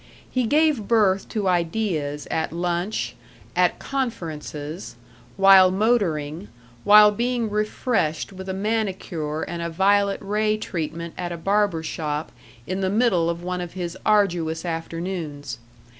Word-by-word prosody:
He 255 -3 0
gave 295 -6 +2
birth 205 -4 +2
to 210 -3 -2
ideas 170 -5 -1
at 160 - -1
lunch, 175 +4 -2 0.4
at - - +3
"conferences," 165 - -5 0.4
while 195 -1 +8
motoring, 185 -5 0 0.4
while 210 0 +8
being 235 0 -1
refreshed 210 -5 -1
with 190 0 -8
a - - -1
manicure 190 -7 -2
and 170 -1 -5
a 170 - -2
violet 200 +3 +2
ray 215 +1 0
treatment 170 -4 -4
at 175 -1 -3
a 170 - -4
barber 195 -1 +1
shop 150 -1 -3 0.3
in 185 +4 -3
the 190 - +1
middle 195 -6 +2
of 170 0 -3
one 180 0 -3
of 175 -1 -6
his 175 -1 -4
arduous 175 -6 +1
afternoons. 165 -6 -4
185 Hz, 130 wpm, -23 LUFS, 165-210 Hz, 0.4 s, while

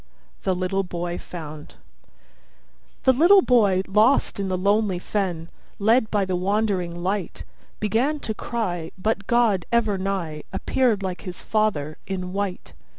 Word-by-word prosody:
THE 190 -2 0
LITTLE 185 +2 0
BOY 175 -1 -4
FOUND 155 -3 -9 1.3
The 260 - +5
little 350 +8 +6
boy 205 -7 +3
lost 215 +4 +3
in 195 - -1
the 185 -1 -1
lonely 200 0 +2
fen, 180 -3 -2 0.3
Led 220 +2 +3
by 205 -2 +1
the 185 -1 -1
wandering 185 -3 -1
light, 195 0 -2 0.4
Began 235 +9 +1
to 220 - -2
cry, 180 -8 -3
but 200 0 -1
God, 230 -7 +2
ever 220 -4 +2
nigh, 185 -6 -3
Appeared 235 -6 +1
like 185 -2 -4
his 180 -2 -8
father, 175 -9 0
in 185 -1 -4
white. 195 -2 -3
195 Hz, 140 wpm, -24 LUFS, 180-220 Hz, 1.3 s, little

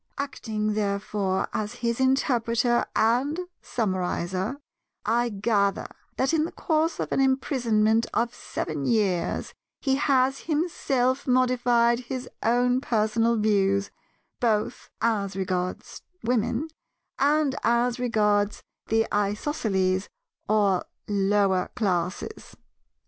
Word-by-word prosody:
Acting, 220 -6 -2
therefore, 200 -2 -1
as 210 -1 -3
his 235 +1 0
interpreter 240 -3 +2
and 255 +9 +2 0.2
summarizer, 185 +1 -2 0.5
I 235 +3 +2
gather 200 -1 +1 0.3
that 265 +4 +1
in 315 -1 +3
the - - -6
course 320 0 0
of - - -3
an - - +1
imprisonment 235 -5 +2
of 235 0 0
seven 150 -3 -4
years 195 -7 0 0.3
he 270 -2 +1
has 270 -1 +2
himself 280 -5 0
modified 245 -2 +3
his 250 0 -5
own 245 +2 +2
personal 225 0 +1
views, 200 -2 +2 0.5
both 215 -3 0
as 205 -4 0
regards 185 -1 -3 0.2
Women 245 +5 0 0.5
and 290 0 +3
as 235 +1 +1
regards 210 -4 +1 0.2
the 225 0 +2
Isosceles 200 -3 0 0.4
or 205 -4 +3 0.2
Lower 195 -2 +2
Classes. 195 - -2
230 Hz, 100 wpm, -26 LUFS, 205-255 Hz, 0.5 s, in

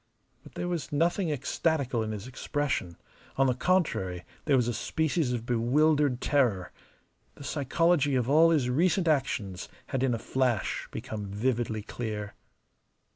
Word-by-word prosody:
But - - -16
there 175 - -3
was 175 -3 -3
nothing 170 +4 +1
ecstatical 140 -2 0
in 110 - -2
his 105 -1 -6
expression; 130 - -3 0.4
on 135 - +4
the 130 - +3
contrary, 120 - 0 0.2
there 145 - +3
was 125 -3 +2
a 120 - 0
species 160 +4 0
of 120 -2 -3
bewildered 135 +3 +2
terror. 120 -11 +1 0.6
The - - -11
psychology 145 +1 +1
of 125 -2 +1
all 160 +4 +6
his 150 -7 +2
recent 170 +7 +2
actions 110 - -1 0.2
had 130 - -1
in 130 -3 +2
a - - -2
flash 125 -2 -1
become 105 -2 -6
vividly 110 +1 -1
clear. 105 -2 -5
130 Hz, 145 wpm, -28 LUFS, 115-150 Hz, 0.6 s, all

